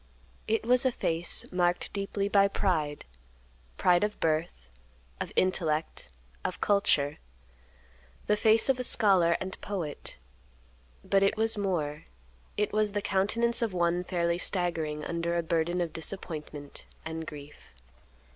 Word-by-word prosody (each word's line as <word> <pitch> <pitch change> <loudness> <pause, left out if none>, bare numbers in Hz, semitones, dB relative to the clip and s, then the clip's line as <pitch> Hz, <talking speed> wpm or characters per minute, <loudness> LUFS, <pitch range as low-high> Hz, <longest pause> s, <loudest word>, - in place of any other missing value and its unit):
It 220 0 +1
was 250 +1 +5
a 260 - +3
face 165 -6 0
marked 175 -1 0
deeply 200 0 -2
by 200 -1 +4
pride; 160 -7 -1 0.7
pride 180 +1 +4
of 210 0 -2
birth, 155 - -1 0.5
of - - -4
intellect, 165 -4 0 0.3
of - - -3
culture; 150 -8 +2 1.1
the 210 - +3
face 220 +1 +4
of 265 -2 +2
a - - -1
scholar 185 -8 +4
and 190 0 -6
poet; 180 -7 -4 0.9
but 195 - +2
it 195 +1 +2
was 225 +1 +1
more—it 150 - -4
was 210 -1 +1
the 205 - -1
countenance 230 +5 +1
of 225 -4 0
one 175 0 +1
fairly 170 -1 0
staggering 165 -6 -1
under 170 0 -1
a 170 - 0
burden 170 +2 0
of 170 -2 -3
disappointment 155 -4 -5 0.2
and 160 0 -5
grief. 145 - -11
175 Hz, 130 wpm, -29 LUFS, 160-205 Hz, 1.1 s, was